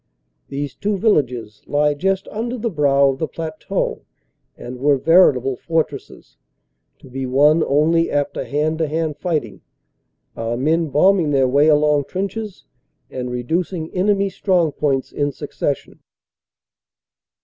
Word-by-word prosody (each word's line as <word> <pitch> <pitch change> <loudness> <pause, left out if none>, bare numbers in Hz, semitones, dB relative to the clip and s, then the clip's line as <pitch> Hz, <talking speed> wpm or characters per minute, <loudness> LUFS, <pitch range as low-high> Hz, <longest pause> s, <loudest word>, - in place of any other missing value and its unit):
These 140 -1 -4
two 205 +6 -2
villages 125 - 0
lie 150 0 +2
just 190 +5 -1
under 235 +3 -4
the 230 0 -2
brow 140 -3 +3
of 135 0 -3
the 160 - -1
plateau 160 -1 -4 0.6
and 125 +1 -8
were 140 +1 +3
veritable 135 -5 +4
fortresses, 160 -3 -4 0.6
to - - -16
be 130 +1 -5
won 150 +5 +4
only 160 +4 +2
after 145 -1 -1
hand 150 +5 -1
to 160 - +1
hand 155 0 -2
fighting, 155 - -3 0.7
our 115 +1 -3
men 160 +4 +1
bombing 175 +2 +3
their 135 -2 +3
way 140 +4 +3
along 150 -2 +3
trenches 200 +3 -5 0.5
and 125 -1 -4
reducing 160 +7 -3
enemy 195 +1 +1
strong 180 -6 +1
points 140 -2 -1
in 145 0 -1
succession. - - -4
150 Hz, 130 wpm, -20 LUFS, 135-170 Hz, 0.7 s, veritable